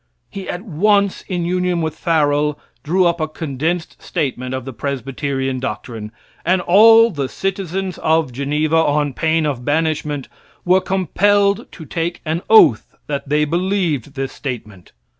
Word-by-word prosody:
He 195 -2 -7
at 175 +2 -4
once, 200 +1 +1
in 175 -3 -2
union 180 0 0
with 160 -1 -2
Farel, 150 -3 +1 0.2
drew 180 +4 +2
up 170 -1 +1
a 155 - 0
condensed 160 +2 -3
statement 130 -6 -3
of 130 -1 -5
the 135 - -6
Presbyterian 135 0 -3
doctrine, 110 -3 -5 0.3
and 185 +3 +2
all 225 +5 +6
the 140 -6 -3
citizens 190 -1 -3
of 160 -4 +1
Geneva, 150 +4 0
on 150 -3 +1
pain 160 +2 +1
of 135 -5 -2
banishment, 150 -1 -1 0.4
were 185 +1 +4
compelled 200 +3 +1
to 160 - -10
take 170 +2 -3
an 160 +2 -1
oath 215 - +5
that 140 -1 -4
they, 150 +1 +2
believed 170 - -1
this 135 -1 -3
statement. 110 -9 -7
160 Hz, 145 wpm, -19 LUFS, 140-180 Hz, 0.4 s, all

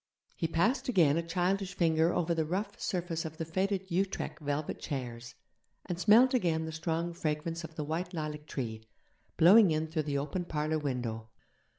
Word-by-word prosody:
He 165 - -1
passed 215 - +1
again 165 - +4
a 165 - +1
childish 180 +2 -1
finger 165 -1 +3
over 170 -1 0
the 165 -1 +1
rough 195 +6 -3
surface 175 -3 -2
of 160 0 -7
the 165 - -3
faded 190 +3 -1
Utrecht 190 +1 -1
velvet 145 0 -3
chairs, 120 -4 -5 0.5
and 175 -1 -4
smelled 230 +7 +6
again 165 -9 +1
the 160 - -5
strong 165 +2 -2
fragrance 165 +1 -3
of 160 0 -9
the 155 - -3
white 165 +4 -3
lilac 150 -3 -5
tree, 110 -5 -4 0.5
blowing 195 +4 +8
in 155 0 0
through 160 0 -2
the 140 - 0
open 150 +6 -3
parlour 155 -1 -1
window. 120 -6 -3
165 Hz, 175 wpm, -31 LUFS, 150-180 Hz, 0.5 s, blowing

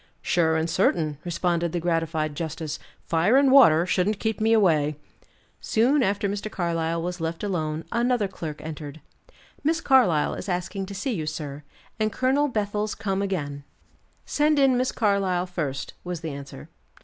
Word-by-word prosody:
"Sure 160 -2 +2
and 160 +1 0
certain," 160 -4 +1
responded 170 -1 -1
the 175 - 0
gratified 165 -2 -1
justice; 155 -1 -4 0.3
"fire 170 +10 +3
and 275 -1 +5
water 175 - +7
shouldn't 190 +3 +1
keep 220 -1 -2
me 220 +1 +3
away." 160 -9 +3 0.6
Soon 255 +6 +2
after 200 -2 +1
Mr. 205 +2 -3
Carlyle 165 -3 -1
was 180 0 -4
left 165 +2 -3
alone 160 -5 -2
another 235 -2 +1
clerk 160 -5 -7
entered. 155 -1 -7 0.6
"Miss 320 +2 +2
Carlyle 240 - +3
is - - -6
asking 185 +2 -3
to 200 - -7
see 235 +6 -2
you, 160 -7 -3
sir, 150 -2 -5 0.4
and 215 0 +1
Colonel 265 +6 +2
Bethel's 210 -3 -2
come 195 -3 -2
again." 145 -8 -3 0.6
"Send 300 0 +2
in 270 -2 +4
Miss 255 +1 +1
Carlyle 195 -5 +1
first," 155 -7 -4
was 175 -2 -5
the 160 -2 -4
answer. 140 -1 -9
180 Hz, 160 wpm, -25 LUFS, 160-215 Hz, 0.6 s, water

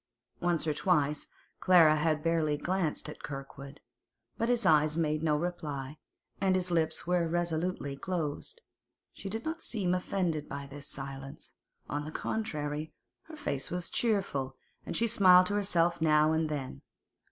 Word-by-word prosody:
Once 175 -3 +1
or 155 - +1
twice 150 -3 +1 0.3
Clara 170 -4 +6
had 155 0 +1
barely 160 -3 +1
glanced 175 -1 -1
at 150 - -9
Kirkwood, 140 0 -8 0.5
but 230 +1 -1
his 240 -3 +2
eyes 155 -2 +4
made 155 -2 +1
no 155 -2 +2
reply, 150 -4 -4 0.4
and 190 -1 +3
his 180 -1 0
lips 160 -2 0
were 175 -1 +1
resolutely 170 -3 -1
closed. 165 - -4 0.5
She 195 - -7
did 225 +3 -5
not 325 +1 -3
seem 195 -6 0
offended 180 -4 -1
by 140 0 -5
this 140 +1 -8
silence; 135 0 -7 0.4
on 145 0 -2
the 155 - -6
contrary, 155 -7 -3 0.3
her 320 - -10
face 140 - -3
was 175 -1 -3
cheerful, 185 - 0 0.3
and - - -2
she 230 - +2
smiled 185 -5 +6
to 205 - -1
herself 175 -4 +1
now 155 -1 +4
and 160 0 +1
then. 135 - -4
160 Hz, 150 wpm, -31 LUFS, 150-180 Hz, 0.5 s, Clara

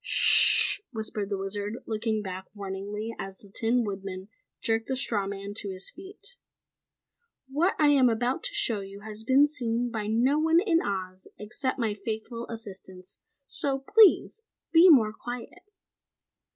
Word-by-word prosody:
"Sh - - +6
hh!" - - -38
whispered 215 -4 -4
the 200 - -2
Wizard, 200 +2 -4
looking 220 -1 -2
back 190 -1 -6
warningly 205 +3 -5
as 195 0 -6
the 200 - -16
Tin 235 +4 0
Woodman 195 -1 -6 0.3
jerked 225 -1 -1
the 265 - -1
straw 210 -6 -1
man 200 0 -6
to 205 - -5
his 190 0 -5
feet. 390 +6 -10 1.1
"What 310 +8 0
I 300 -1 +4
am 270 -4 +5
about 240 +3 -1
to - - -2
show 225 -3 +1
you 195 +1 -10
has 215 +1 -9
been 265 +5 +5
seen 245 -5 -1
by 215 -2 -4
no 245 +7 +2
one 325 +1 +4
in 345 -4 +2
Oz 185 -2 -5
except 250 +6 -3
my 225 -4 -1
faithful 220 +3 -6
assistants! 190 -4 -8 0.3
So 275 -1 -1 0.2
please 445 +1 +5 0.3
be 340 +3 +7
more 225 -9 +5
quiet!" 245 +10 -8
220 Hz, 155 wpm, -27 LUFS, 200-260 Hz, 1.1 s, be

